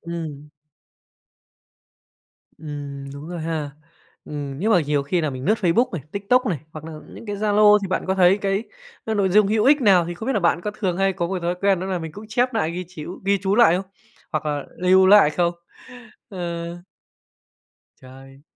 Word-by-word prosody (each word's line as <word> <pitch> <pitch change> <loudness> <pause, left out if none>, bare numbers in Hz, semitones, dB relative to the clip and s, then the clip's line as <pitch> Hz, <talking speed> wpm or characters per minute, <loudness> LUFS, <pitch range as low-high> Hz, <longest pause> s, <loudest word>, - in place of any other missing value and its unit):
ừm. 160 -4 -7 2.1
Ừm, 145 -2 -7
đúng 140 +3 -9
rồi 175 -1 -5
ha! 160 -2 -3 0.5
Ừm, 140 -2 -6
nhưng 210 +7 0
mà 180 - +5
nhiều 145 -2 0
khi 170 +6 0
nà 155 -2 -1
mình 130 -1 -7
lướt 215 +7 +2
Facebook 200 +7 +2
này, 170 -6 -4
TikTok 245 +6 +1
này 170 -7 -1
hoặc 155 0 -9
nà 160 - -8 0.2
những - - -11
cái 205 -1 -4
Zalo 210 0 +5
thì 195 - -3
bạn 185 - -1
có 190 - +1
thấy 190 +1 +4
cái 195 +1 -1 0.4
n 220 -1 -1
nội 200 -2 +2
dung 205 +2 +4
hữu 215 +1 +1
ích 285 +2 +5
nào? 195 -7 +5
Thì 175 - -4
không 220 +6 -8
biết 270 - +1
là 210 - 0
bạn 170 -1 +2
có 210 - -3
thường 185 -5 -1
hay 195 0 +2
có 175 -2 -2
một 190 +2 -3
thói 175 +1 0
quen 195 -2 +2
đó 185 - -4
nà 190 -2 -2
mình 160 -2 -7
cũng 205 +5 -10
chép 245 +3 +1
nại, 160 -6 0
ghi 180 +2 -5
chíu 175 0 -9
ghi 200 0 +2
chú 195 0 +1
lại 210 -7 +5
không? 190 +1 -5 0.5
Hoặc 155 -1 -2
là 145 -2 -2
lưu 185 +1 +5
lại 195 -6 +7
không? 170 +2 0 0.8
Ờ. 170 -2 -5 1.2
Trời! 135 +1 -15
180 Hz, 205 wpm, -22 LUFS, 155-200 Hz, 2.1 s, lại